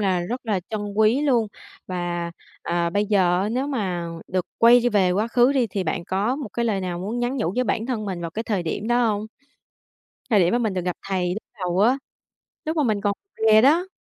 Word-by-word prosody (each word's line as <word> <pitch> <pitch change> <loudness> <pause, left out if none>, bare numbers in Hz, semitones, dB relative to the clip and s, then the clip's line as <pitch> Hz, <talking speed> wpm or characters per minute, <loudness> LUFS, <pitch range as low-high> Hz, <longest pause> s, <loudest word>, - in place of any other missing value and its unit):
là 190 -3 +1
rất 240 +7 -5
là 200 -4 0
trân 215 - -2
quý 220 +6 +3
luôn. 245 -7 +2 0.4
Và, 175 -1 -3 0.3
ờ, 170 0 0
bây 205 +3 0
giờ 185 -4 +3
á 205 - -1
nếu 255 +5 -1
mà 190 -11 -2 0.2
được 185 -1 -1
quay 235 +1 +7
đi 245 - +2
về 195 -5 +3
quá 210 +5 0
khứ 245 +3 +4
đi 260 -4 +2
thì 195 -2 -3
bạn 170 - -2
có 200 +8 0
một 285 -6 -5
cái 235 - -1
lời 210 -4 0
nào 180 -2 -3
muốn 205 +7 -3
nhắn 245 +2 -1
nhủ 195 -8 -1
với 250 - +1
bản 230 -2 -1
thân 240 -5 -2
mình 190 -4 -4
vào 170 -1 -4
cái 220 - -4
thời 205 -5 -1
điểm 200 +7 -3
đó 240 0 +3
hông? 210 -1 -1 1.0
Thời 210 - +5
điểm 175 +2 +3
mà 240 - +3
mình 220 -5 -1
được 180 - -1
gặp 180 -1 -2
thầy 180 -2 0
lúc 215 - -6 0.2
đầu 180 +2 0
á, 245 +6 +4 0.7
lúc 315 +1 -2
mà 305 - +3
mình 215 -6 +1
còn 205 0 +1 0.4
rè 215 0 +7
đó. 325 +8 +4
210 Hz, 240 wpm, -23 LUFS, 185-240 Hz, 1.0 s, quay